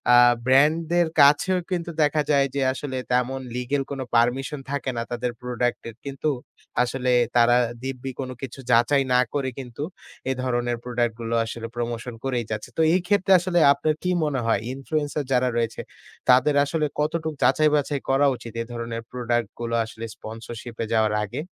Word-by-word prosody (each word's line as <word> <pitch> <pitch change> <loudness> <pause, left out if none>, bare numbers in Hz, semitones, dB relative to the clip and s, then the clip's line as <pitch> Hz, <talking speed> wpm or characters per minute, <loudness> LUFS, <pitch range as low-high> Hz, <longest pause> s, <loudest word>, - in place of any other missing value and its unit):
আ - - +8 0.3
brand 145 +5 +5 0.2
দের 175 -1 +4
কাছেও 150 +6 +5
কিন্তু 170 -1 -2
দেখা 150 +1 +2
যায় 140 -1 +4
যে 140 - 0
আসলে 135 -1 -5
তেমন 125 +2 +1 0.2
লিগ্যাল 135 +3 -1
কোনো 135 -2 -3
পারমিশন 135 +5 +1
থাকে 140 -2 -2
না 115 - 0
তাদের 120 0 -2
প্রোডাক্টের। 120 -2 -2
কিন্তু 140 +2 -2 0.5
আসলে 125 0 -1 0.3
তারা 120 +1 +5 0.3
দিব্যি 135 0 -4
কোন 130 -1 -3
কিছু 135 0 -7
যাচাই 130 +4 +4
না 125 - +5
করে 135 -2 0
কিন্তু 125 +2 -6 0.5
এ - - +2
ধরনের 120 -1 0
প্রোডাক্ট 120 -2 0
গুলো 115 0 -2
আসলে 115 0 -6
প্রমোশন 120 0 -4
করেই 125 -4 -1
যাচ্ছে। 105 -1 -4
তো - - +3
এই 185 - +3
ক্ষেত্রে 200 -1 +2
আসলে 175 0 +1
আপনার 155 +1 0
কি 180 - +1
মনে 145 -3 -1
হয় 115 - +2
ইনফ্লুয়েন্সার 145 +1 -2
যারা 125 0 +3
রয়েছে 115 -1 -1 0.5
তাদের 130 +3 +5
আসলে 155 +1 0
কতটুকু 160 +1 0
যাচাই 150 +4 +4
বাছাই 145 -1 0
করা 135 +2 +4
উচিত 115 -2 -10
এ - - -1
ধরনের 115 -1 -4
প্রোডাক্ট 120 -3 -1
গুলো 115 0 -2
আসলে 110 +1 -8
স্পন্সরশিপ 115 +1 -8
এ - - -2
যাওয়ার 110 -1 +3
আগে? 100 - -8
130 Hz, 175 wpm, -24 LUFS, 120-145 Hz, 0.5 s, আ